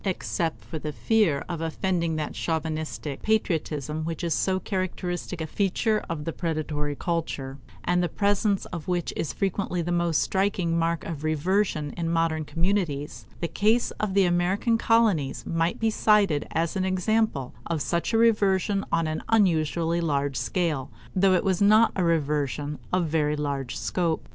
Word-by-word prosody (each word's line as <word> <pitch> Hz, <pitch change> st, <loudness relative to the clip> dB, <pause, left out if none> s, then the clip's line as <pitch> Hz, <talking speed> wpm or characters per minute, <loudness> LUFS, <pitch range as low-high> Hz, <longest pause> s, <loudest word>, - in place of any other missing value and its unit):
Except 175 Hz, -3 st, -2 dB
for 160 Hz, -, -5 dB
the 150 Hz, 0 st, -4 dB
fear 150 Hz, -, +1 dB
of 170 Hz, -2 st, -4 dB
offending 170 Hz, 0 st, -1 dB
that 155 Hz, -1 st, -3 dB
chauvinistic 155 Hz, -3 st, -3 dB
patriotism 155 Hz, -8 st, -1 dB
which 165 Hz, +2 st, -4 dB
is 170 Hz, -2 st, +1 dB
so 190 Hz, -1 st, +1 dB
characteristic 180 Hz, -2 st, -3 dB
a -, -, -1 dB
feature 205 Hz, +5 st, 0 dB
of 150 Hz, -3 st, -4 dB
the 165 Hz, -, -2 dB
predatory 155 Hz, -3 st, -2 dB
culture, 140 Hz, -5 st, -3 dB, 0.2 s
and 180 Hz, 0 st, +2 dB
the 175 Hz, -, 0 dB
presence 205 Hz, 0 st, +1 dB
of 170 Hz, -3 st, -5 dB
which 175 Hz, -2 st, -1 dB
is 150 Hz, -, -2 dB
frequently 190 Hz, 0 st, -1 dB
the 175 Hz, -, -2 dB
most 170 Hz, -2 st, +2 dB
striking 190 Hz, -3 st, 0 dB
mark 170 Hz, 0 st, 0 dB
of 155 Hz, -3 st, -5 dB
reversion 155 Hz, 0 st, 0 dB
in 165 Hz, -1 st, -2 dB
modern 165 Hz, -2 st, +1 dB
communities, 165 Hz, -4 st, -1 dB
the 170 Hz, -, 0 dB
case 215 Hz, +8 st, +2 dB
of 205 Hz, -3 st, -1 dB
the 195 Hz, -1 st, +5 dB
American 180 Hz, +6 st, +2 dB
colonies 225 Hz, -11 st, +2 dB
might 165 Hz, +1 st, 0 dB
be 225 Hz, -1 st, +2 dB
cited 205 Hz, -9 st, +3 dB
as 165 Hz, +3 st, -1 dB
an 190 Hz, -, 0 dB
example 185 Hz, -, 0 dB
of 170 Hz, -2 st, -1 dB
such 165 Hz, +6 st, -1 dB
a 225 Hz, -, +3 dB
reversion 205 Hz, -3 st, +3 dB
on 165 Hz, -1 st, +2 dB
an 155 Hz, 0 st, -2 dB
unusually 170 Hz, -5 st, +2 dB
large 140 Hz, -4 st, 0 dB
scale, 160 Hz, -7 st, -1 dB, 0.3 s
though 190 Hz, 0 st, +4 dB
it 180 Hz, -, +1 dB
was 190 Hz, -1 st, +1 dB
not 215 Hz, +3 st, +6 dB
a 185 Hz, -, +1 dB
reversion 150 Hz, -3 st, 0 dB
of 180 Hz, -1 st, +2 dB
very 150 Hz, -1 st, +1 dB
large 140 Hz, -4 st, -3 dB
scope. 170 Hz, -3 st, -1 dB
170 Hz, 165 wpm, -26 LUFS, 155-190 Hz, 0.3 s, not